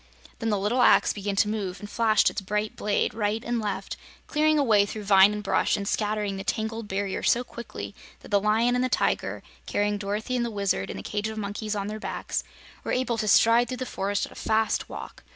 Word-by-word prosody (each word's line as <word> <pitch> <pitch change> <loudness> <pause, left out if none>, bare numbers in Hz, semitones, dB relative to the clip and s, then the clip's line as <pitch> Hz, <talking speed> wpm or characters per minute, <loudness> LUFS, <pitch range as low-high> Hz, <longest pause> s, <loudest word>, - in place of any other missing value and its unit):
Then 225 - -1
the 210 - +2
little 210 +6 +1
axe - - +5
began 200 -1 -3
to 205 - +3
move 200 -4 -3
and 205 - -8
flashed 220 -1 +3
its - - -4
bright 210 +2 -2
blade 205 -1 0
right 215 +1 -1
and 240 0 -1
left, 200 -2 -4 0.3
clearing 310 0 +2
a 290 - +3
way 215 -5 +5
through 210 +1 -5
vine 195 0 +6
and 210 0 -4
brush 200 - +2
and 200 -1 -4
scattering 210 -2 -1
the 195 - -5
tangled 220 +1 -2
barrier 195 0 -2
so 245 - +2
quickly 235 -1 -8 0.3
that - - -13
the 200 -1 +4
Lion 220 +4 +2
and 250 0 +1
the 255 - 0
Tiger, - - 0 0.2
carrying 205 0 0
Dorothy 210 +5 -2
and 245 - +1
the 235 - -1
Wizard 200 -3 -1
and - - -5
the - - -7
cage 210 +1 -2
of 220 0 -6
monkeys 210 +1 -3
on 200 -1 -2
their 215 +1 -5
backs, - - -3 0.4
were - - -3
able 250 -2 0
to 215 - -1
stride 230 +3 +5
through 255 - -4
the 255 - -3
forest 200 -3 -1
at - - -14
a - - -9
fast 220 0 +1
walk. - - -9
210 Hz, 230 wpm, -26 LUFS, 205-230 Hz, 0.4 s, vine